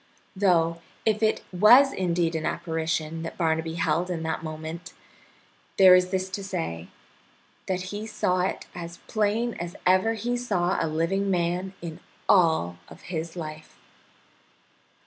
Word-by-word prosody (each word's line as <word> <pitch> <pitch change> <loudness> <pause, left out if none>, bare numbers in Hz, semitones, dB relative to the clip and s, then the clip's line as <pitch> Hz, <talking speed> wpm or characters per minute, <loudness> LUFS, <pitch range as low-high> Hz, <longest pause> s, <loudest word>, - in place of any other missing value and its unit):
Though 170 -4 +2 0.2
if 215 -1 +2
it 220 0 +1
was 245 +9 +7
indeed 170 -2 0
an 160 - -2
apparition 160 -1 -2
that 165 - -6
Barnaby 160 -1 0
beheld 165 +2 0
in 165 -3 -3
that 160 0 -3
moment, 160 +2 -7 0.8
there 190 -1 +9
is 180 0 +4
this 185 0 -1
to 200 +1 -4
say, 85 - -4 0.8
that 185 -1 -1
he 210 +2 -5
saw 185 -4 0
it 180 - -1
as 170 -1 -7
plain 220 +2 0
as 175 0 -5
ever 185 +5 +3
he 240 +3 -2
saw 185 -7 0
a - - 0
living 170 +6 0
man 180 +1 -1
in 165 0 -6 0.3
all 160 - +3
of - - -13
his 165 +1 -4
life. 155 -2 -8
175 Hz, 145 wpm, -26 LUFS, 160-195 Hz, 0.8 s, there